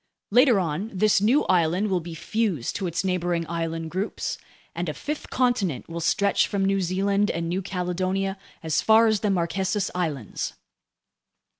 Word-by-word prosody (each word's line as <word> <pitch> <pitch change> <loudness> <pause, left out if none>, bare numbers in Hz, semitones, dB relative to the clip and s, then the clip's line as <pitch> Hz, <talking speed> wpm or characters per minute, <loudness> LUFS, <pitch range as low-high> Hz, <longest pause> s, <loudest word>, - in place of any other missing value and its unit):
Later 245 -1 +5
on, 180 +4 -2
this 200 +1 +3
new 245 +8 +4
island 180 +3 +2
will 185 - +2
be 170 0 -8
fused 190 - -1
to 195 - -2
its 170 +2 -2
neighboring 175 -3 -1
island 165 -1 -3
groups, 190 +5 -3 0.3
and - - -3
a - - -4
fifth 300 +1 -5
continent 240 - 0
will 170 0 -5
stretch 200 +4 +2
from 200 -2 0
New 195 0 +2
Zealand 195 +3 +1
and 165 0 -2
New 180 +3 -1
Caledonia 190 +1 -2 0.2
as 160 -1 +1
far 220 +1 +6
as 215 -2 +2
the 210 - 0
Marquesas 190 +2 0
Islands. 150 - -3
185 Hz, 160 wpm, -25 LUFS, 170-205 Hz, 0.3 s, far